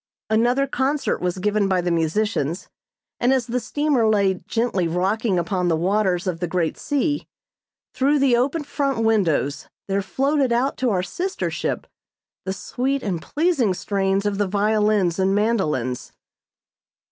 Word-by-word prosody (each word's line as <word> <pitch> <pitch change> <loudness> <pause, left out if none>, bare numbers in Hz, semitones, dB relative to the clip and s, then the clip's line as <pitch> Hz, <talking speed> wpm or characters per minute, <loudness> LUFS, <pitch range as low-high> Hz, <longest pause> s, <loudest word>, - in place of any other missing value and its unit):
Another 240 +5 +3
concert 275 +2 -1
was 180 0 -1
given 205 +1 +1
by 190 -1 +2
the 175 0 -1
musicians, 170 0 0 0.5
and 245 - +3
as 260 -3 +2
the 245 +2 -1
steamer 280 -4 +1
lay 195 -3 +2
gently 225 -7 0
rocking 190 +4 0
upon 180 +1 0
the 165 - +2
waters 185 +1 +1
of 180 -3 -2
the 175 - -1
great 170 -2 -1
sea, 290 +1 -1 0.7
through 280 +3 +2
the 270 -3 +4
open 280 +6 0
front 275 -4 -1
windows 175 -10 +1 0.2
there 195 0 0
floated 270 +6 0
out 250 +4 +1
to 255 - +1
our 185 -4 +1
sister 365 - -3
ship - - -3 0.6
the 190 - -1
sweet 265 +7 -2
and 180 -6 -2
pleasing 290 - +1
strains 195 +1 0
of 205 -1 -1
the 205 - +1
violins 210 -2 +1
and 190 +1 +2
mandolins. 155 - -1
210 Hz, 150 wpm, -22 LUFS, 185-255 Hz, 0.7 s, the